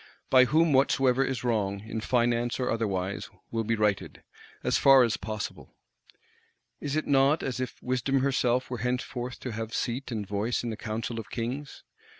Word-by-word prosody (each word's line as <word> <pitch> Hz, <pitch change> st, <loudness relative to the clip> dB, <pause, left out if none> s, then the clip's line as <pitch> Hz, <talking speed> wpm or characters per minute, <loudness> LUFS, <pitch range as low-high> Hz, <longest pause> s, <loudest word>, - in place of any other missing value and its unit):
By 130 Hz, -1 st, +7 dB
whom 160 Hz, +3 st, +3 dB
whatsoever 135 Hz, -1 st, +3 dB
is 130 Hz, -3 st, -2 dB
wrong, 100 Hz, -5 st, 0 dB
in 110 Hz, +1 st, -5 dB
Finance 120 Hz, 0 st, +1 dB
or 125 Hz, -, 0 dB
otherwise, 100 Hz, -4 st, -2 dB, 0.2 s
will 115 Hz, -1 st, -1 dB
be 115 Hz, +1 st, 0 dB
righted,—as 105 Hz, -2 st, -2 dB
far 135 Hz, -2 st, +7 dB
as 115 Hz, -2 st, +1 dB
possible. 110 Hz, -1 st, -6 dB, 1.0 s
Is 145 Hz, 0 st, -3 dB
it 155 Hz, -, 0 dB
not 140 Hz, +3 st, +3 dB
as 130 Hz, -1 st, -3 dB
if 130 Hz, -, -3 dB
Wisdom 130 Hz, +2 st, +1 dB
herself 130 Hz, -2 st, +1 dB
were 125 Hz, -, -3 dB
henceforth 125 Hz, +1 st, -3 dB
to 125 Hz, -, -4 dB
have 110 Hz, +1 st, -4 dB
seat 125 Hz, +3 st, -2 dB
and 110 Hz, -3 st, -3 dB
voice 105 Hz, +5 st, -1 dB
in 120 Hz, -, -2 dB
the -, -, -4 dB
Council 115 Hz, +2 st, -4 dB
of 110 Hz, -1 st, -8 dB
Kings? 125 Hz, +5 st, -5 dB
120 Hz, 165 wpm, -28 LUFS, 110-130 Hz, 1.0 s, By